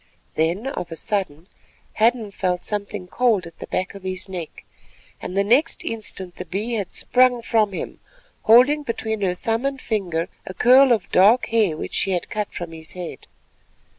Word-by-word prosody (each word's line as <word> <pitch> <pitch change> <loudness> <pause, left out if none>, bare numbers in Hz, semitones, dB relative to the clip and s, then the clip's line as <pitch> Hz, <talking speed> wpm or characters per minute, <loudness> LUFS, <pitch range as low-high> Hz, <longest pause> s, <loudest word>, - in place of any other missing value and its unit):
Then 170 +8 0
of 225 -11 -4
a - - -4
sudden 180 -4 -3 0.5
Hadden 225 -1 +2
felt 180 -2 -2
something 205 -2 -3
cold 220 -1 +1
at 170 - -13
the - - -7
back 185 - -2
of 200 - -10
his 185 0 -2
neck, 180 -4 -7 0.6
and 185 - -5
the 200 - +4
next 245 +10 +2
instant 195 -5 -4
the - - -6
Bee 210 +6 -3
had 205 -5 -2
sprung 250 -1 +2
from 220 -3 +2
him, 190 - -6 0.4
holding 255 +7 +6
between 220 -5 -3
her 180 -2 +1
thumb 225 +5 -1
and 275 -1 -2
finger 180 -8 -2 0.2
a 185 - -7
curl 260 +2 +6
of 230 - +1
dark 210 +7 +5
hair 215 -8 +2
which - - -6
she 195 - +1
had 175 - -3
cut 210 -1 -2
from 175 -1 -6
his 160 -1 -6
head. 180 -2 -8
205 Hz, 180 wpm, -22 LUFS, 180-230 Hz, 0.6 s, holding